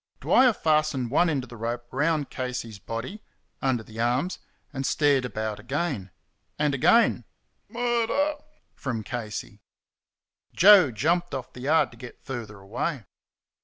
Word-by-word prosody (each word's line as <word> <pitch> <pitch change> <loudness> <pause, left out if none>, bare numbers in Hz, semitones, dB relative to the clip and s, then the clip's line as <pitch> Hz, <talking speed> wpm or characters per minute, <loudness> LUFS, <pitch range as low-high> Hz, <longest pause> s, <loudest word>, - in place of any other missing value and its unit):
Dwyer 255 -1 +5
fastened 155 - +1
one 175 +4 +3
end 140 -5 -1
of 125 - -11
the - - -8
rope 120 +2 -3
round 150 +1 0
Casey's 125 -5 -5
body 115 - -6 0.4
under 130 -4 0
the 110 0 -11
arms 125 +10 0 0.3
and 135 0 -3
stared 140 -2 +2
about 110 -3 -4
again. 130 - -3 0.5
And 150 -1 +1
again 230 - +4 0.5
"Murder!" 245 +5 0 0.4
from 120 -5 -4
Casey. 105 -3 -6 0.9
Joe 195 -5 +8
jumped 165 - 0
off 130 -2 -6
the 125 - -10
yard 155 +5 +2
to 120 - -15
get 120 0 -12
further 115 -6 -6
away. 115 +7 -3
130 Hz, 135 wpm, -26 LUFS, 115-160 Hz, 0.9 s, Joe